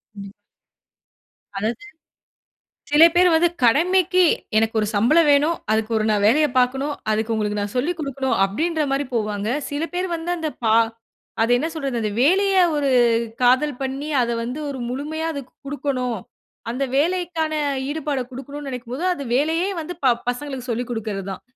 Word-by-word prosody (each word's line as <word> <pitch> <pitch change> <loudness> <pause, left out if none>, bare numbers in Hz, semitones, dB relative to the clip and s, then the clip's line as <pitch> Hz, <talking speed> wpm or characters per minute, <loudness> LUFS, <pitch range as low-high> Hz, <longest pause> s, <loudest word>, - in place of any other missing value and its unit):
ம். 200 -1 -9 1.2
அதாவது 220 - -3 1.1
சில 295 +2 +7
பேர் 360 +1 +5
வந்து 345 +2 +4
கடமைக்கு, 360 +8 +4 0.3
"எனக்கு 225 +1 +2
ஒரு 210 - 0
சம்பளம் 300 +11 +4
வேணும், 295 +4 +3 0.2
அதுக்கு 220 +1 0
ஒரு 215 - +1
நான் 205 -1 +1
வேலையை 300 +7 +4
பார்க்கனும், 265 +4 +1 0.2
அதுக்கு 220 +1 0
உங்களுக்கு 210 -1 -1
நான் 205 0 -4
சொல்லிக் 330 +8 -1
கொடுக்கணும்," 275 -3 -2
அப்படின்ற 315 - -1
மாரி 275 +1 0
போவாங்க. 210 -2 -1 0.2
சில 290 +3 -2
பேர் 365 +1 -1
வந்து 330 +1 -5
அந்த 320 -2 -2
பா 220 0 +4 0.7
அது 230 - +1
என்ன 310 +6 -1
சொல்றது 275 -6 -3
அந்த 215 -1 -1
வேலையை 380 +7 +4
ஒரு 285 -2 +1 0.5
காதல் 255 +3 +3
பண்ணி 270 +2 -3
அதை 235 -1 0
வந்து 245 +5 -4
ஒரு 275 - -5
முழுமையா 305 +5 -3
அதற்கு 280 -4 -8
குடுக்கணும், 270 -4 -2 0.5
அந்த 255 +4 -1
வேலைக்கான 335 0 0 0.4
ஈடுபாட 290 -2 -2
குடுக்கணுனு 280 +2 -8
நினைக்கும் 250 -1 -6
போது, 305 +7 -4
அது 280 -4 -6
வேலையே 325 +7 +1
வந்து 335 +3 -6
ப 250 -2 +5 0.2
பசங்களுக்கு 260 0 -6
சொல்லிக் 245 +2 -3
குடுக்கிறது 210 -4 -4
தான். - - -9
275 Hz, 155 wpm, -22 LUFS, 235-315 Hz, 1.2 s, சில